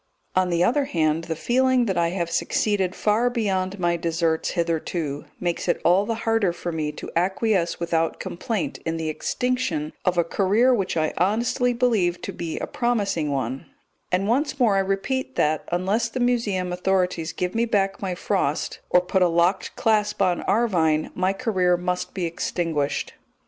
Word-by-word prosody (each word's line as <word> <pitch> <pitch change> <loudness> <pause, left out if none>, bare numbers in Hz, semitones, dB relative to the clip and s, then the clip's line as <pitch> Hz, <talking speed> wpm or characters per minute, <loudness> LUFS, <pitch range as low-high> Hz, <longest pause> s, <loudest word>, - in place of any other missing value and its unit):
On 185 -1 +3
the 170 0 +2
other 275 +8 +2
hand, 160 - 0
the 165 - -3
feeling 255 +6 +2
that 195 -4 -1
I 170 -1 +2
have 170 -1 -2
succeeded 195 -2 0
far 220 +3 +2
beyond 200 -5 -1
my 175 -2 +1
deserts 165 -1 0
hitherto, 165 -3 -2
makes 175 0 -2
it 175 - +1
all 185 +4 +4
the 230 - 0
harder 225 -5 +2
for 175 0 -5
me 155 -2 -2
to - - -8
acquiesce 190 0 +1
without 165 -1 0
complaint 205 +2 -3
in 165 0 -2
the 160 -1 -2
extinction 185 -4 -1
of 180 -1 +1
a 170 - +4
career 205 +9 +3
which 195 -7 -1
I 155 -1 +1
honestly 235 +7 +1
believe 220 -8 +1
to - - -4
be 165 -2 -4
a - - -2
promising 205 -10 0
one; 135 -1 -3 0.4
and 185 +2 +1
once 270 +4 0
more 225 -5 +4
I - - +3
repeat 195 +8 -1
that, 150 0 0
unless 195 +6 0
the 255 - -4
Museum 210 -7 0
authorities 180 -3 0
give 180 +1 -3
me 230 +1 +1
back 195 -3 0
my 185 -2 -2
Frost, 175 -5 -1
or 180 - +5
put 185 +1 0
a 180 - +6
locked 170 +3 +1
clasp 210 -2 +1
on 185 -3 +2
Arvine, 165 -9 +2
my 185 +1 +1
career 190 -5 +1
must 180 +1 -3
be 185 -3 -1
extinguished. 165 -3 -2
185 Hz, 175 wpm, -24 LUFS, 170-220 Hz, 0.4 s, a